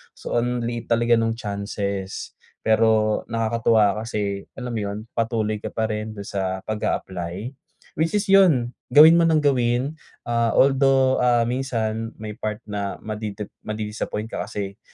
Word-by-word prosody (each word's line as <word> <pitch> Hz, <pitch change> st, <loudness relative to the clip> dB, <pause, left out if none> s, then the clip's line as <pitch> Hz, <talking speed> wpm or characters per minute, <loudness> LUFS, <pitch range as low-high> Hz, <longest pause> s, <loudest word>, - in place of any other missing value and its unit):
So -, -, -3 dB
ang 120 Hz, 0 st, -1 dB
liit 120 Hz, 0 st, -3 dB
talaga 120 Hz, 0 st, +3 dB
nung 115 Hz, 0 st, +1 dB
chances, 100 Hz, -3 st, -4 dB, 0.3 s
pero 110 Hz, -1 st, +3 dB
nakakatuwa 115 Hz, -2 st, +2 dB
kasi, 100 Hz, -3 st, -3 dB
alam 125 Hz, -, -5 dB
mo 115 Hz, -, -2 dB
yun, 100 Hz, 0 st, -3 dB, 0.2 s
patuloy 110 Hz, -2 st, 0 dB
ka -, -, -5 dB
pa 110 Hz, -1 st, -1 dB
rin 110 Hz, +1 st, -4 dB
dun 100 Hz, -, -6 dB
sa 95 Hz, -1 st, -3 dB
pag-a-apply. 95 Hz, -1 st, -3 dB, 0.5 s
Which 165 Hz, +5 st, +1 dB
is 205 Hz, -, +2 dB
yun, 160 Hz, -12 st, +5 dB, 0.2 s
gawin 160 Hz, +3 st, +9 dB
mo 165 Hz, -, +4 dB
nang 155 Hz, -2 st, +3 dB
gawin, 130 Hz, +2 st, +1 dB, 0.2 s
ah, 115 Hz, -1 st, 0 dB
although, 135 Hz, -1 st, +4 dB
ah, 120 Hz, -1 st, +3 dB
minsan 115 Hz, -3 st, -2 dB
may 110 Hz, -1 st, -7 dB
part 105 Hz, -1 st, -4 dB
na 100 Hz, -2 st, -4 dB
madidip 105 Hz, -1 st, -5 dB, 0.2 s
madi-disappoint 110 Hz, +1 st, -4 dB
ka -, -, -4 dB
kasi, 100 Hz, -1 st, -5 dB
110 Hz, 150 wpm, -23 LUFS, 105-120 Hz, 0.5 s, gawin